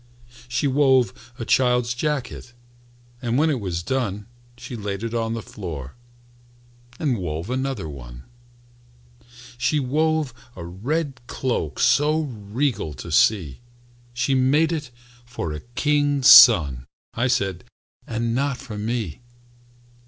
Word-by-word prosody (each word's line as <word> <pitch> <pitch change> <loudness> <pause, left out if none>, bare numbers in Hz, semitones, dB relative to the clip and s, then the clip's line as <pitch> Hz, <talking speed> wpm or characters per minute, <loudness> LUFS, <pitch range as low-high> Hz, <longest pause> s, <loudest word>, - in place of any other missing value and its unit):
She 125 +4 -1
wove 130 -3 +2
a 115 - -5
child's 125 -1 +2
jacket, 125 -2 -3 0.7
And 120 -1 -1
when 155 +2 +3
it 135 - -1
was 90 -5 -3
done 105 -4 -2 0.3
She 125 0 -8
laid 100 -1 -4
it 115 0 -4
on 115 -1 -1
the 115 - -5
floor 75 -9 -7 1.0
And 135 -8 -1
wove 85 +4 -4
another 130 -8 -2
one. - - -10 1.4
She 130 +5 +1
wove 150 +1 0 0.2
a 85 - -8
red 130 - -3
cloak 100 - -2
So 150 +2 +3
regal 110 - -3
to 65 - -8
see, 85 - +2 0.5
"She's 120 +2 0
made 145 +6 +3
it 150 -5 -3 0.3
for 120 -10 -5
a 75 - -5
king's 145 - +1
son," 85 - +8 0.3
I 120 +3 0
said, 100 -8 -1 0.4
"and 115 0 -2
not 135 +1 0
for 105 -3 -8
me." 110 -6 -3
120 Hz, 125 wpm, -23 LUFS, 100-135 Hz, 1.4 s, son